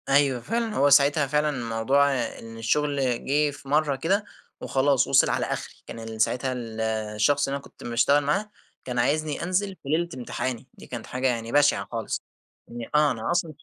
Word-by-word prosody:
أيوه 135 -2 +3
فعلًا 230 - -2
هو 145 - +4
ساعتها 145 +1 +5
فعلًا 150 +2 +1 0.2
موضوع 140 +5 +3 0.3
إن 115 0 -10
الشغل 145 +5 0 0.2
جه 145 +2 +2
في 140 - -13
مَرّة 150 -1 +2
كده، 190 +10 0 0.4
وخلاص 135 -1 +2
وصل - - +5
على - - 0
أخري، - - -5
كان 115 - -8
ال 110 -1 -5
ساعتها 130 +3 +1 0.6
الشخص 145 +7 +2
اللي 135 - -2
أنا 140 - -6
كنت - - -15
مشتغل 120 +5 +3
معاه، 195 +9 0 0.4
كان 125 -1 -2
عايزني 150 +5 0
أنزل 190 +2 -1
في 135 - -8
ليلة 170 +3 +1
امتحاني، 125 0 -4
دي - - -14
كانت 120 -3 -6
حاجة 130 +1 -1
يعني 115 -2 -2
بشعة 145 +1 +3
خالص، 115 -2 -3 0.4
يعني 120 -1 -8
آه 150 -1 +5
أنا 115 +3 -3
أصلًا 170 -2 0
140 Hz, 180 wpm, -25 LUFS, 125-150 Hz, 0.6 s, ساعتها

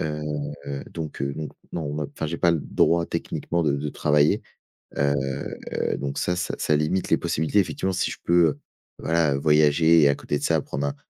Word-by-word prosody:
Heu 75 -1 -2 0.7
donc 80 -4 -6
heu 70 - -1
donc 75 -2 -6 0.2
non, 75 -3 -3
enfin, 75 +1 -4
j'ai 85 +2 -3
pas 85 - +4
le 85 - +1
droit 85 +3 +2
techniquement 85 0 -2
de 75 -3 +2
de 75 +1 -3
travailler. 75 0 +2 0.6
Heu 70 0 +2 0.8
donc 70 0 -4
ça 90 +5 0
ç 90 - -3
ça 75 - +1
limite 75 +5 0
les - - +5
possibilités. 80 +7 0
Effectivement, 95 0 -1
si - - 0
je - - -7
peux, 85 0 +4
heu, 75 - -2 0.4
voilà, 80 -4 +1
voyager 75 +2 +4
et 70 - +6
à 70 - +2
côté 75 - -2
de - - -8
ça, - - +2
prendre 70 +1 -3
un 70 - -3
75 Hz, 195 wpm, -24 LUFS, 70-85 Hz, 0.8 s, et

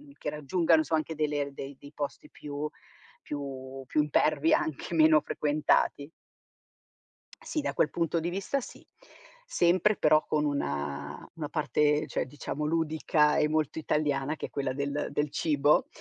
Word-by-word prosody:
mhmm, 290 -1 -16
che - - -4
raggiungano 160 +3 +2
insomma 160 +1 +1
anche 155 +1 -2
delle 150 -1 0
r 140 - -9
dei 135 0 -8
dei 145 +1 -13
posti 145 -1 -5
più 145 +1 -5 0.5
più 135 -2 -6
più 150 - +1
impervi, 150 +1 +2
anche 155 +2 -2
meno 155 -1 +6
frequentati. 145 0 +1 1.3
Sì, 305 - -3
da 285 - -2
quel 150 - +2
punto 170 -1 0
di 170 +2 -2
vista 195 +9 -1
sì; - - -11 0.6
sempre, 185 - +3
però 155 0 +4
con 150 -1 +1
una 70 - -3
una 155 -3 -5
parte, 150 -1 +1
cioè - - -2
diciamo, 145 +2 -5
ludica 155 -1 +2
e 150 -1 +3
molto 155 0 0
italiana, 150 -1 0
che - - -4
è - - -18
quella 135 -2 -2
del 140 +2 -2
del 145 0 -1
cibo. 150 -1 +2
150 Hz, 155 wpm, -29 LUFS, 140-160 Hz, 1.3 s, meno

